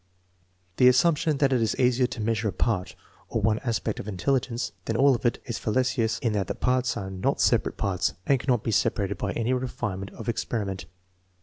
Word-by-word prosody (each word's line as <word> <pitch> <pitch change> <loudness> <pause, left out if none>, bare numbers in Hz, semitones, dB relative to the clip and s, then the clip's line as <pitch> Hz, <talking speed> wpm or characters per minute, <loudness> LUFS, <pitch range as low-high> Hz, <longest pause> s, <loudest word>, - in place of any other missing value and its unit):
The 125 - +6
assumption 150 +3 +3
that 135 -1 +2
it 125 - +2
is 110 - +1
easier 125 0 +3
to 120 - -6
measure 110 0 0
a - - 0
part, 95 0 -1 0.3
or - - -1
one 110 +1 +2
aspect, 115 -3 -2
of - - -6
intelligence 120 +4 -1
than 115 - -2
all 140 +1 +5
of 120 0 0
it, 120 - -1
is 120 -3 -4
fallacious 115 -1 0
in 115 -3 +1
that 100 -3 -1
the - - -3
parts 125 -1 0
are 95 -1 -5
not 95 -1 -1
separate - - +2
parts 95 -2 0
and 135 -2 +3
cannot 120 -4 0
be 115 - -1
separated 100 -2 0
by 100 - -2
any 115 +2 0
refinement 110 -6 -3
of - - -9
experiment. 105 -4 -2
115 Hz, 200 wpm, -26 LUFS, 105-130 Hz, 0.3 s, The